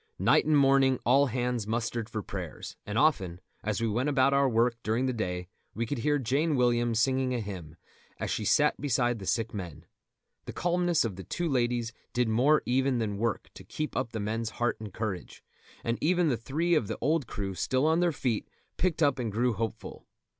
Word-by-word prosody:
Night -, -, +4 dB
and 155 Hz, -1 st, +4 dB
morning 135 Hz, -1 st, +4 dB
all 140 Hz, +4 st, +5 dB
hands 125 Hz, -3 st, -2 dB
mustered 115 Hz, 0 st, -2 dB
for 110 Hz, -2 st, -4 dB
prayers; -, -, -7 dB
and 105 Hz, +2 st, -2 dB
often, 95 Hz, -, +2 dB, 0.2 s
as 110 Hz, 0 st, -1 dB
we 115 Hz, -, 0 dB
went 120 Hz, +7 st, 0 dB
about 135 Hz, -1 st, +3 dB
our 140 Hz, -1 st, +4 dB
work 115 Hz, +1 st, +2 dB
during 115 Hz, +4 st, 0 dB
the 130 Hz, -, 0 dB
day, 90 Hz, -6 st, -3 dB, 0.3 s
we 115 Hz, -, -1 dB
could 120 Hz, +3 st, -3 dB
hear 145 Hz, +5 st, +2 dB
Jane 145 Hz, +5 st, +1 dB
Williams 120 Hz, -2 st, +2 dB
singing 130 Hz, +1 st, +1 dB
a -, -, -1 dB
hymn, 90 Hz, -7 st, -7 dB, 0.4 s
as -, -, -2 dB
she -, -, -1 dB
sat 150 Hz, +8 st, +3 dB
beside 120 Hz, -4 st, +1 dB
the 95 Hz, -, -8 dB
sick 115 Hz, 0 st, 0 dB
men. 85 Hz, -6 st, -7 dB, 0.6 s
The -, -, -6 dB
calmness 175 Hz, -4 st, +1 dB
of 100 Hz, -5 st, -4 dB
the 95 Hz, -, -7 dB
two 175 Hz, -, -3 dB
ladies 120 Hz, -4 st, 0 dB, 0.2 s
did 125 Hz, -1 st, +1 dB
more 130 Hz, +8 st, +3 dB
even 130 Hz, +1 st, +1 dB
than 105 Hz, -3 st, -2 dB
work 115 Hz, -2 st, -2 dB
to -, -, -11 dB
keep 155 Hz, 0 st, -5 dB
up 130 Hz, -3 st, -1 dB
the 110 Hz, -, -4 dB
men's 110 Hz, +2 st, -2 dB
heart 120 Hz, +2 st, -1 dB
and 110 Hz, -2 st, -7 dB
courage; 105 Hz, -3 st, -5 dB, 0.4 s
and 115 Hz, 0 st, -1 dB
even 175 Hz, 0 st, +3 dB
the 130 Hz, -, +2 dB
three 155 Hz, +9 st, -1 dB
of 150 Hz, -11 st, +2 dB
the -, -, -4 dB
old 155 Hz, -4 st, +1 dB
crew 100 Hz, -3 st, -4 dB
still 130 Hz, +8 st, 0 dB
on 160 Hz, +2 st, +3 dB
their 175 Hz, -1 st, +3 dB
feet 125 Hz, -7 st, -2 dB, 0.3 s
picked 170 Hz, -3 st, +1 dB
up 140 Hz, -3 st, +2 dB
and 115 Hz, -3 st, -2 dB
grew 120 Hz, +3 st, +1 dB
hopeful. 110 Hz, +1 st, -5 dB
120 Hz, 205 wpm, -29 LUFS, 110-140 Hz, 0.6 s, all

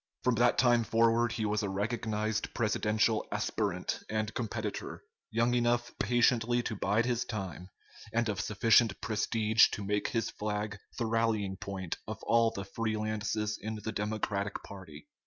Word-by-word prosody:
From 125 Hz, -, +3 dB
that 120 Hz, +1 st, +3 dB
time 120 Hz, -2 st, +4 dB
forward 115 Hz, +1 st, +3 dB
he 110 Hz, -, -2 dB
was 105 Hz, 0 st, 0 dB
a 100 Hz, -, -2 dB
recognized 110 Hz, +1 st, -2 dB
presidential 110 Hz, -1 st, +1 dB
aspirant -, -, -1 dB
and 110 Hz, -1 st, -1 dB
competitor, 110 Hz, -3 st, -4 dB, 0.3 s
young 120 Hz, +2 st, +1 dB
enough 120 Hz, 0 st, +1 dB
patiently 120 Hz, +1 st, +3 dB
to 110 Hz, -, -3 dB
bide 105 Hz, +4 st, +1 dB
his 120 Hz, -1 st, 0 dB
time, 95 Hz, -5 st, -6 dB, 0.4 s
and 115 Hz, 0 st, +1 dB
of 105 Hz, -3 st, -1 dB
sufficient 110 Hz, 0 st, +3 dB
prestige 110 Hz, 0 st, +3 dB
to 105 Hz, -, -5 dB
make 105 Hz, +1 st, 0 dB
his 115 Hz, -3 st, -1 dB
flag 105 Hz, 0 st, -3 dB, 0.2 s
the 115 Hz, -, 0 dB
rallying 110 Hz, -4 st, 0 dB
point 95 Hz, -2 st, -5 dB
of -, -, -4 dB
all 115 Hz, 0 st, +4 dB
the 100 Hz, -3 st, -6 dB
free 110 Hz, +2 st, -2 dB
lances 105 Hz, 0 st, -2 dB
in 110 Hz, +1 st, -4 dB
the 110 Hz, +1 st, -4 dB
Democratic 105 Hz, -1 st, -2 dB
party. 90 Hz, -7 st, -11 dB
110 Hz, 155 wpm, -31 LUFS, 105-115 Hz, 0.4 s, time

